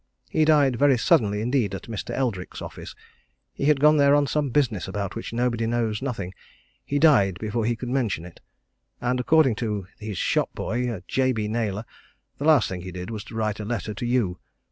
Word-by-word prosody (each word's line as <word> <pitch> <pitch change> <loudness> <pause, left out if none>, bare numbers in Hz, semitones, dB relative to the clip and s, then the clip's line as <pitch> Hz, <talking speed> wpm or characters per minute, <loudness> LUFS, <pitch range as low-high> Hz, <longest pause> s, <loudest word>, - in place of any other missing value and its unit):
He 155 - +3
died 145 -5 +4
very 140 -1 +4
suddenly 105 -2 +2
indeed 115 -4 0
at - - -7
Mr. 110 -3 -6
Eldrick's 115 -9 -2
office. - - -8 0.6
He - - -3
had 150 -1 +4
gone 150 +2 +5
there 140 0 +5
on 145 0 +3
some 145 0 0
business 120 -7 0
about 100 0 -3
which 115 - -5
nobody 115 -1 0
knows 115 -2 -1
nothing 115 -9 -4 0.5
he 145 - -2
died 125 - +4
before 110 +1 -2
he 120 +1 +1
could 120 +2 -6
mention 115 -10 -1
it. 90 - -13 0.6
And 125 +1 0
according 135 -3 +3
to 105 -5 -2
his 105 -3 -5
shop - - +1
boy, 115 -5 -2
Jabey 130 -5 0
Naylor, 110 -1 -2 0.5
the 145 - -3
last 155 -7 +5
thing 90 -2 -5
he 90 +1 -7
did 90 +4 -6
was 105 -2 -5
to 110 - -10
write 110 -1 -1
a - - -4
letter 110 0 -3
to 110 - -5
you. 115 -8 0
115 Hz, 195 wpm, -25 LUFS, 105-135 Hz, 0.6 s, gone